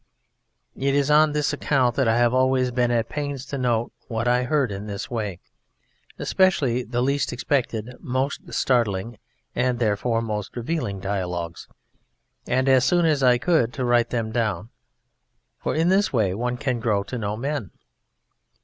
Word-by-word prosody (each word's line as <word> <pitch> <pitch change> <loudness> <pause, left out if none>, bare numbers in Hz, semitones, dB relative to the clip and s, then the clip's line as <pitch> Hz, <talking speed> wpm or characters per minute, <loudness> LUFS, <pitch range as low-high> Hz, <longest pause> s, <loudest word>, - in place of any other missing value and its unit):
It 140 +1 0
is 145 +1 +2
on 150 0 +5
this 150 0 0
account 135 -4 +1
that 135 -3 +2
I 115 +1 +3
have 120 0 +3
always 130 0 +2
been 120 0 +1
at 115 -2 +1
pains 145 -3 -4
to 140 - -5
note 120 -2 0 0.2
what 115 0 -2
I 125 +1 +3
heard 140 -4 +1
in 100 +2 -6
this 100 +2 -6
way, 105 -6 -3 0.8
especially 140 -10 +2
the 120 0 -2
least 140 0 0
expected, 120 -3 -1
most 130 +2 -3
startling, 115 -3 0 0.4
and 125 0 +1
therefore 115 +1 0
most 105 -3 -4
revealing 120 - -3
dialogues, 90 -4 -3 0.8
and 130 +2 +1
as 130 -1 +5
soon 175 +6 +3
as 150 -3 +2
I 125 -2 +5
could 125 -5 +1
to 130 - -2
write 120 -1 +3
them 115 -2 -2
down, 110 -3 -1 0.9
for - - -2
in 165 +3 +2
this 195 +2 +3
way 105 -7 +1
one 125 +4 -2
can 130 -3 -1
grow 105 -4 +1
to 125 +4 -5
know 105 0 -3
men. 135 - -3
125 Hz, 165 wpm, -24 LUFS, 110-135 Hz, 0.9 s, on